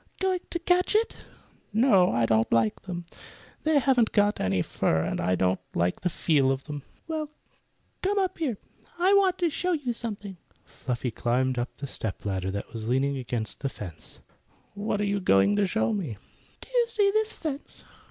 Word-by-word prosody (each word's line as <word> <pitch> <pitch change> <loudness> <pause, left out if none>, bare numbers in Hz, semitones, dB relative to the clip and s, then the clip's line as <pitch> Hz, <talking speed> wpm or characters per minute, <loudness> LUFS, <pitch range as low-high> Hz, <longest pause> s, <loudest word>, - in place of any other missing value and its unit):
"Going 375 -1 +1
to - - -1
catch 360 +3 +2
it?" 450 +2 +2 0.5
"No, 205 -5 +5
I 115 0 +2
don't 110 0 +2
like 115 -2 +2
them. 175 -2 -6 0.6
They 310 -1 +3
haven't 250 -5 +3 0.2
any 95 -1 +1
fur, 80 0 +1
and - - -2
I 90 - +2
don't 95 +1 +1 0.2
like 90 +1 0
the 180 - +1
feel 145 -6 +2
of 135 0 -2
them." 145 -1 -6 0.3
"Well, 310 -2 -3 0.7
come 400 +2 0
on 390 - +4
up 370 -1 -7
here. 265 -10 -1 0.4
I 365 +3 +4
want 385 -2 +4
to 345 -2 +2
show 360 +4 0
you 280 -7 -1
something." 205 -5 -5 0.3
Fluffy 125 -1 -4
climbed 125 +3 0
up 120 - -1
a - - +1
step 110 -7 -4
ladder 95 -2 -1
that 100 +1 -5
was 110 -1 -5
leaning 135 +3 +2
against 120 -3 -3
the 135 - -2
fence. 85 -10 -9 0.6
"What 205 0 -2
are - - +1
you 200 0 0
going 95 - +4
to 205 -1 +3
show 220 +3 +1
me?" 160 - -3 0.4
"Do - - -12
you 480 -1 +3
see 415 -3 +3
this 435 +1 +1
fence? 295 -3 -6
190 Hz, 185 wpm, -27 LUFS, -, 0.7 s, No